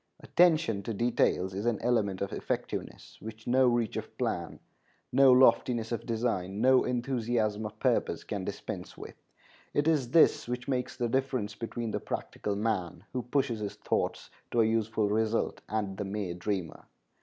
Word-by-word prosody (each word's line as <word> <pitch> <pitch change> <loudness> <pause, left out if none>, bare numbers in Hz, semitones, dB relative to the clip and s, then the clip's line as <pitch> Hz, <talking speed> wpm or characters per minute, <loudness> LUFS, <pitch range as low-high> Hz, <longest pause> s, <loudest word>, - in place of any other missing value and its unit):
Attention 160 - +3
to 110 +2 -4
details 115 -5 +1
is 100 +4 -3
an 120 -3 +2
element 105 -6 +1
of 100 - -5
effectiveness - - -4
which 110 0 -9
no 130 +1 +4
reach 120 -3 +1
of - - -6
plan, - - -2 0.5
no 135 -1 +6
loftiness 125 -2 +4
of 115 - -3
design, 110 -5 -1
no 130 +2 +5
enthusiasm 120 -4 -1
of - - -12
purpose - - 0
can - - -4
dispense - - -6
with. - - -9 0.6
It 145 +1 +2
is 145 -7 +2
this 160 -2 +4
which 125 +1 -4
makes 125 -2 -2
the 120 - 0
difference 130 -4 -1
between 115 0 -4
the - - -1
practical 105 - -4
man, 100 -5 -2
who 125 - -1
pushes 125 -2 0
his 105 -1 -4
thoughts - - -2 0.2
to 120 - +2
a - - +4
useful 110 -1 +1
result, 110 +2 0
and 105 -3 -2
the 105 - -3
mere 95 -2 -3
dreamer. 90 -1 -4
115 Hz, 165 wpm, -30 LUFS, 105-125 Hz, 0.6 s, no